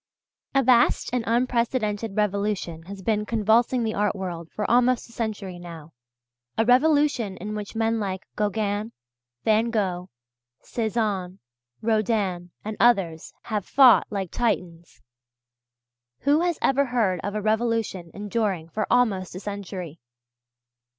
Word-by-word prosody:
A 270 - +4
vast 245 -1 +3
and 250 -2 +1
unprecedented 230 -3 0
revolution 200 -5 -1
has 195 0 -8
been 210 +1 +1
convulsing 230 +3 +2
the 220 -1 -1
art 210 -1 0
world 175 -4 -5
for 210 - -4
almost 245 +1 +3
a - - -17
century 205 -6 -4
now, 165 -3 -10 0.6
a 225 - +3
revolution 260 -5 +3
in 210 +3 -5
which 210 +1 -6
men 225 0 +1
like 190 -3 -3
Gauguin, 210 +1 -1 0.5
Van 220 +2 +3
Gogh, 185 -5 -1 0.5
Cézanne, 210 -5 -2 0.5
Rodin, 210 -5 0 0.2
and 215 0 -4
others, 190 -9 +2
have 210 -3 -2
fought 255 +2 +6
like 195 -4 -3
Titans. 175 -8 -3 1.2
Who 290 +2 +3
has 345 -2 0
ever 275 +1 +3
heard 225 -8 +1
of 205 +1 -3
a - - 0
revolution 220 -5 0
enduring 205 -4 -2
for 215 +5 -2
almost 200 -8 +1
a - - -5
century? 190 -5 -6
210 Hz, 130 wpm, -25 LUFS, 190-235 Hz, 1.2 s, fought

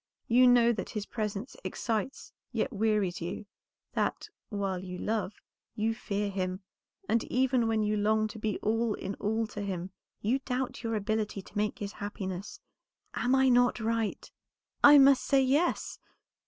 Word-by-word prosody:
You 250 +2 +6
know 240 -1 +6
that 210 - -5
his 210 -2 -4
presence 210 +2 -4
excites, 230 +3 -3 0.2
yet 270 - -1
wearies 210 -4 0
you; 175 +5 -5 0.5
that, - - -1 0.2
while 195 -4 -2
you 180 -1 -6
love, 215 0 -2 0.4
you 225 0 0
fear 205 -3 -3
him, 185 0 -3 0.5
and 230 0 +2
even 255 -2 +2
when 220 -1 +1
you 210 0 +1
long 215 +1 +2
to 220 - -9
be 215 -2 -1
all 225 0 +1
in 195 - -5
all 220 +2 0
to 210 -1 -7
him, 190 -2 -4 0.3
you 240 +6 +1
doubt 255 -1 -3
your 225 -2 -2
ability 210 -1 -2
to - - -17
make 210 0 0
his 205 -1 -5
happiness. 195 -2 -6 0.5
Am 250 +2 +1
I 265 0 +4
not 245 0 +4
right?" 225 -1 -2 0.5
"I 290 0 +10
must 275 -1 +6
say, 275 -1 +3
yes." 285 +7 +1
215 Hz, 160 wpm, -30 LUFS, 205-245 Hz, 0.5 s, I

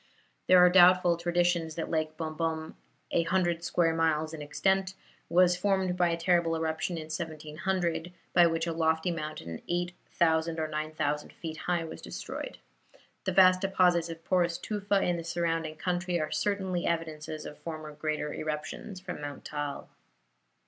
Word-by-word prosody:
There 185 - +7
are 180 0 +8
doubtful 180 -1 +6
traditions 170 -1 +1
that 165 - -4
Lake 155 -1 -1
Bombom, 160 0 -3 0.4
a - - +3
hundred 175 -1 0
square 165 -1 +2
miles 160 -1 +1
in 155 - -6
extent, 190 +6 0 0.3
was 180 0 +5
formed 190 -1 +1
by 175 -1 +3
a 170 - 0
terrible 170 -1 +2
eruption 160 +2 -2
in 160 - -4
1700, 160 +2 -3 0.2
by 175 -1 +7
which 165 0 0
a 165 - -2
lofty 160 +1 +1
mountain 155 - -5
8000 170 -2 0
or 155 - 0
9000 155 -1 -2
feet 160 -2 -6
high, 175 0 -1
was 160 - -8
destroyed. - - -6 0.7
The - - +1
vast 185 -1 +6
deposits 180 -3 +3
of 165 0 -8
porous 175 -2 +2
tufa 205 -2 0
in 175 -1 +1
the 165 - -5
surrounding 165 -2 -1
country 175 +1 -1
are 155 - -2
certainly 190 -4 -1
evidences 155 -2 -3
of 150 - -9
former 155 -2 -6
great 155 +1 -2
eruptions 155 +6 -4
from 185 -5 -7
Mount 145 -1 -7
Taal. 145 -1 -4
165 Hz, 155 wpm, -29 LUFS, 155-180 Hz, 0.7 s, are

